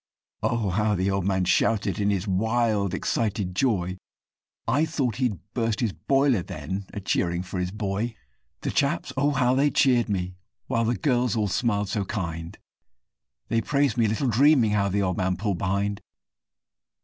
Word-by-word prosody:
Oh! 115 -5 0
how 105 +2 +1
the 95 +1 0
old 95 -2 -1
man 95 -1 +1
shouted 100 +1 +1
in 100 0 +2
his 100 0 -1
wild, 110 0 +1
excited 105 -5 -1
joy! 95 -6 0 0.7
I 135 +6 +2
thought 135 -8 -1
he'd 125 -7 0 0.2
burst 115 -3 0
his 115 -6 0
boiler 135 -6 +2
then, 90 +5 -5
a - - -5
cheering 90 -2 0
for 90 0 -5
his 90 0 -1
boy; 105 +3 -3 0.5
The - - -2
chaps, - - 0
oh! 140 +2 +2
how 130 -3 +2
they 140 +3 +3
cheered 125 -6 +3
me, 90 -2 -2 0.3
while 115 0 0
the 120 +2 +1
girls 125 -6 +1
all 105 -2 +1
smiled 105 -1 0
so 105 -1 -1
kind, 85 -4 -5 0.9
They 115 - +2
praised 140 -2 +1
me, 115 -2 +3
little 110 +6 0
dreaming, 125 -1 +4
how 100 -1 +1
the 100 +1 0
old 90 -2 -1
man 90 -1 0
pulled 100 -2 -2
behind. 100 +2 -1
105 Hz, 170 wpm, -25 LUFS, 95-120 Hz, 0.9 s, dreaming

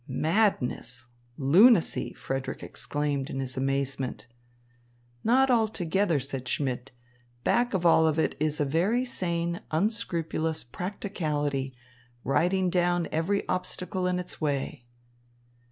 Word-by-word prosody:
"Madness, 130 - 0 0.3
lunacy!" 175 - +5
Frederick 135 0 -4
exclaimed 145 -2 -2
in 135 - -4
his 130 -2 -3
amazement. 135 -1 -2 1.0
"Not 260 +3 +4
altogether," 200 - +1
said 135 -1 -5
Schmidt. 130 -2 -2 0.5
"Back 240 -3 +2
of 180 - 0
it - - +5
all 160 -1 +5
is 155 -1 0
a 145 - +2
very 190 - +1
sane, 170 -6 -2
unscrupulous 165 -4 -1
practicality, 150 - -3 0.5
riding 180 +7 +2
down 175 -1 +1
every 175 +6 0
obstacle 185 0 -2
in 180 0 0
its 180 -2 -4
way." 140 -3 -2
160 Hz, 105 wpm, -28 LUFS, 140-185 Hz, 1.0 s, lunacy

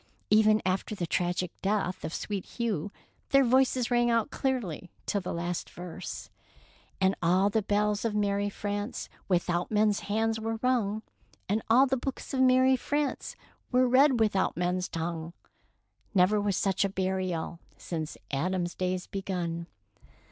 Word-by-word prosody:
*' - - -39
Even 215 0 +5
after 190 +3 -1
the 175 - -2
tragic 180 +1 -1
death 195 -2 -1
of 155 - -3
Sweet 200 +2 -3
Hugh 210 -6 -2 0.4
their 275 0 +6
voices 255 -1 +3
rang 240 0 +3
out 230 +3 +1
clearly 220 - -2 0.2
till 200 - 0
the 180 - -4
last 175 +1 -3
verse, 175 -1 -7 0.2
— - - -28
" - - -32
And 190 0 +3
all 185 +4 +3
the 220 - +2
bells 210 0 +1
of 225 -2 -1
merry 205 0 +1
France 205 +3 -4 0.2
Without 175 -1 +1
men's 210 -1 +3
hands 220 +2 0
were 225 0 -2
rung; 220 -4 +1 0.4
And 210 +3 +1
all 250 +4 +7
the 265 0 0
books 265 +2 -5
of 265 - 0
merry 260 0 +5
France 290 +2 -2 0.4
Were 255 0 +4
read 260 0 +5
without 205 -6 +2
men's 180 +1 0
tongue. 165 0 -4 0.8
Never 195 +3 +4
was 205 -2 0
such 195 -1 +1
a 200 - +1
burial 185 -3 -2 0.2
Since 160 -3 -5
Adam's 175 +5 -1
days 185 0 -2
begun." 175 -4 -3
205 Hz, 155 wpm, -29 LUFS, 180-225 Hz, 0.8 s, all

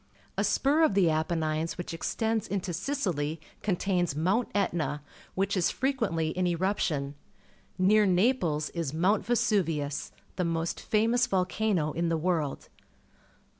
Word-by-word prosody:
A - - 0
spur 290 +4 +2
of 310 -11 +4
the 180 -5 +4
Apennines 160 0 -1
wliich 175 -1 -6
extends 220 +6 -1
into 195 -2 -2
Sicih' 175 - -2 0.2
contains 180 -5 0
Mount 190 +10 +1
Etna, 165 -7 0 0.3
wliich 195 +1 +1
is 180 -3 +2
frequently 225 - 0
in 180 +2 0
eruption. 170 -6 0 0.6
Near 205 +3 +4
Naples 180 - +1
is 160 -4 -3
Mount 190 +6 +2
Vesuvius, 165 -10 0 0.3
the 180 - +1
most 165 0 -1
famous 230 +3 +2
volcano 185 -4 0
in 170 +1 -1
the 165 - +1
world. 160 -4 -1
180 Hz, 130 wpm, -28 LUFS, 160-210 Hz, 0.6 s, of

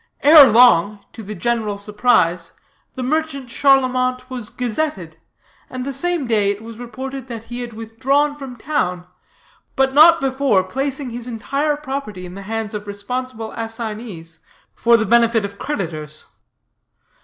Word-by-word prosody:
"Ere 295 -1 +9
long, 210 -4 +4
to 225 - -9
the 210 0 -7
general 215 +1 -1
surprise, 200 -5 +1 0.4
the 255 - -4
merchant 280 -2 -2
Charlemont 255 -2 +2
was 240 -4 -4
gazetted, 270 +6 -3 0.5
and 255 0 -5
the 275 - -3
same 350 0 -1
day 215 -4 +2
it 205 +2 -3
was 230 0 -10
reported 260 +2 -7
that 230 -3 -7
he 240 +2 -7
had 240 -1 -7
withdrawn 260 +7 0
from 270 -3 -9
town, 180 -10 -2 0.7
but 270 0 +2
not 320 +3 +7
before 265 -7 +1
placing 270 +5 -3
his 240 +1 -6
entire 280 +6 -1
property 265 -10 -6
in 180 - -9
the 200 - -8
hands 220 +2 -4
of 210 -1 -6
responsible 225 +3 -5
assignees 220 -7 -6 0.3
for 235 0 +4
the 220 - 0
benefit 235 -2 +3
of 200 0 -9
creditors. 155 - -4
235 Hz, 145 wpm, -19 LUFS, 210-270 Hz, 0.7 s, Ere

